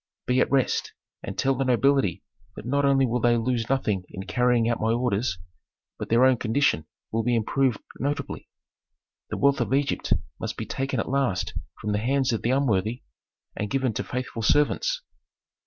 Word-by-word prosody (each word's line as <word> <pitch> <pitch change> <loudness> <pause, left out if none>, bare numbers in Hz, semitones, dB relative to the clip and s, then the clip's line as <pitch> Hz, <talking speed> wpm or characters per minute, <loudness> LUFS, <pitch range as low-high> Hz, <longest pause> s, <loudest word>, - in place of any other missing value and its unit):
"Be 125 +1 +2
at - - +2
rest, 135 -2 +1 0.3
and - - -6
tell 135 - +2
the 135 +1 -1
nobility 130 -7 +2 0.3
that - - -9
not 140 +3 +1
only 135 -1 +4
will 125 0 0
they 120 0 +3
lose 115 -1 -1
nothing 105 -8 0
in 95 - -7
carrying 125 +1 +2
out 115 -1 0
my 110 +1 +2
orders, 115 -4 0 0.6
but - - -5
their 120 +3 +5
own 130 -1 +4
condition 115 - +1 0.2
will 115 - +1
be 120 +2 +1
improved 125 +2 +1 0.2
notably. 145 +3 -3 0.8
The - - -3
wealth 140 0 +3
of 135 - +1
Egypt 140 0 0 0.3
must - - -4
be - - -4
taken 135 -2 -2
at - - -2
last 135 -8 0 0.3
from 105 - -3
the 105 - +1
hands 130 +2 +1
of 110 - -1
the 115 - -1
unworthy 120 -4 +1 0.5
and 105 - -3
given 135 -4 0
to - - -2
faithful 125 -2 -4
servants." 150 - +2
125 Hz, 180 wpm, -25 LUFS, 115-135 Hz, 0.8 s, their